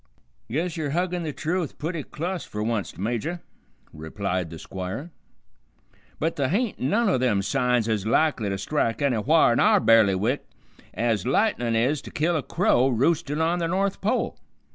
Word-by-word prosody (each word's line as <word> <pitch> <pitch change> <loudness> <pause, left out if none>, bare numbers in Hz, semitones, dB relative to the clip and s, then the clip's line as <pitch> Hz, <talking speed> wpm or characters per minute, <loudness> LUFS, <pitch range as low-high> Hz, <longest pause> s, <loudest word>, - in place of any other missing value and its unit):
"Guess 165 +7 -2
yer 155 -3 -2
huggin' 175 +3 -1
the 160 -2 -3
truth 165 +2 -3
pooty 160 +1 -3
clus 175 +5 -4
fer 105 0 -5
wunst, 110 -3 -2
Major," 120 - -2 0.5
replied 90 +3 -3
the 85 - -8
Squire, 95 - -6 1.1
"but 165 +1 -1
th' 140 -2 0
hain't 215 - -1
none 215 - +1
o' 185 - +2
them 110 -6 +1
signs 125 +1 +1
ez 110 -3 0
likely 115 -1 +1
to 95 - -2
strike 115 +3 -1
anywhar 135 +1 +3
in - - +1
our - - +5
bailiwick 110 +2 +3 0.5
ez 115 -4 0
lightnin' 130 - +1
is 130 +6 +1
to - - -10
kill 170 +3 0
a 155 - +1
crow 135 - +2
roostin' 150 +4 +1
on 170 +2 +1
the 165 - 0
North 195 +3 -1
Pole. 230 +6 0
135 Hz, 165 wpm, -25 LUFS, 110-170 Hz, 1.1 s, our